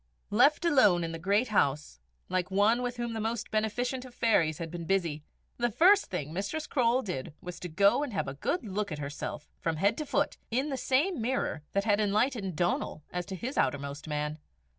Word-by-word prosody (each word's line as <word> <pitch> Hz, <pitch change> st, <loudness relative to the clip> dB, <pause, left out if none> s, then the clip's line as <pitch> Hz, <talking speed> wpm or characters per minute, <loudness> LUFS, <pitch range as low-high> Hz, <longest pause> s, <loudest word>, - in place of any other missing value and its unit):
Left 280 Hz, -, +4 dB
alone 210 Hz, -, +5 dB
in 165 Hz, -, -3 dB
the 165 Hz, -, -6 dB
great 200 Hz, +8 st, +1 dB
house 145 Hz, -, +1 dB, 0.3 s
like 185 Hz, -1 st, -1 dB
one 205 Hz, +5 st, +3 dB
with 245 Hz, 0 st, -3 dB
whom 235 Hz, -1 st, -3 dB
the 225 Hz, -, -3 dB
most 225 Hz, +1 st, -3 dB
beneficent 245 Hz, +4 st, -1 dB
of 255 Hz, -2 st, -12 dB
fairies 170 Hz, -10 st, +2 dB
had 165 Hz, -2 st, -5 dB
been 170 Hz, -1 st, -5 dB
busy, 170 Hz, -5 st, 0 dB, 0.3 s
the 240 Hz, 0 st, +1 dB
first 380 Hz, -, +5 dB
thing 155 Hz, -4 st, -4 dB
Mistress 200 Hz, -, -3 dB
Croale 250 Hz, 0 st, +2 dB
did 155 Hz, -6 st, -5 dB
was 180 Hz, 0 st, -8 dB
to 180 Hz, -, -6 dB
go 200 Hz, -, +4 dB
and 290 Hz, -, -2 dB
have 195 Hz, -, -2 dB
a 135 Hz, -, -4 dB
good 230 Hz, -, -2 dB
look 205 Hz, -1 st, -3 dB
at 150 Hz, -, -3 dB
herself 145 Hz, +1 st, -5 dB
from 165 Hz, -1 st, -1 dB
head 200 Hz, +7 st, +2 dB
to 305 Hz, -, -2 dB
foot -, -, 0 dB
in 260 Hz, +6 st, 0 dB
the 275 Hz, -, -1 dB
same 265 Hz, +5 st, +1 dB
mirror 235 Hz, -, -1 dB
that 200 Hz, -, +1 dB
had 205 Hz, -1 st, +2 dB
enlightened 210 Hz, -, +1 dB
Donal 175 Hz, -2 st, -1 dB
as 180 Hz, -1 st, -3 dB
to 190 Hz, -, -5 dB
his 250 Hz, +9 st, -3 dB
outermost 140 Hz, +2 st, -1 dB
man. 150 Hz, 0 st, -2 dB
200 Hz, 205 wpm, -30 LUFS, 165-245 Hz, 0.3 s, alone